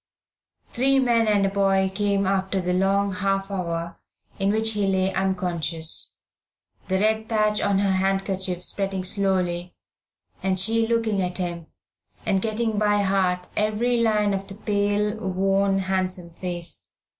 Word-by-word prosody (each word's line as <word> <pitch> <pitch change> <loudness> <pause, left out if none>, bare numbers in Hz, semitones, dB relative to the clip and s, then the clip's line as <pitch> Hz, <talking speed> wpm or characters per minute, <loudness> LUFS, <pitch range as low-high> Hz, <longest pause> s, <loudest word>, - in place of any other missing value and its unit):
Three 270 +2 +2
men 235 -4 +3
and 205 -2 +3
a - - +2
boy 195 -1 +2
came 200 0 +1
after 190 0 0
the 180 0 -1
long 195 +2 +2
half 195 +1 -1
hour 170 -3 -3 0.4
in 195 0 +1
which 220 +1 +2
he 205 -2 0
lay 190 0 +1
unconscious, 175 -4 -2 0.7
the 190 - +1
red 220 +2 +1
patch 215 -1 +1
on 200 -1 +2
her 195 0 +2
handkerchief 190 -1 0
spreading 195 -1 -2
slowly, 185 -2 -1 0.7
and 190 -1 +1
she 225 +4 +2
looking 225 -4 +1
at 180 -1 -2
him, 170 -3 -4 0.6
and 190 -1 +1
getting 220 0 -1
by 205 -1 +2
heart 185 -2 +1
every 215 +3 +1
line 210 -3 +2
of 195 0 -3
the 195 - -8
pale, 205 0 0
worn, 195 -1 +1
handsome 185 -2 -2
face. 175 - -5
195 Hz, 145 wpm, -24 LUFS, 185-210 Hz, 0.7 s, men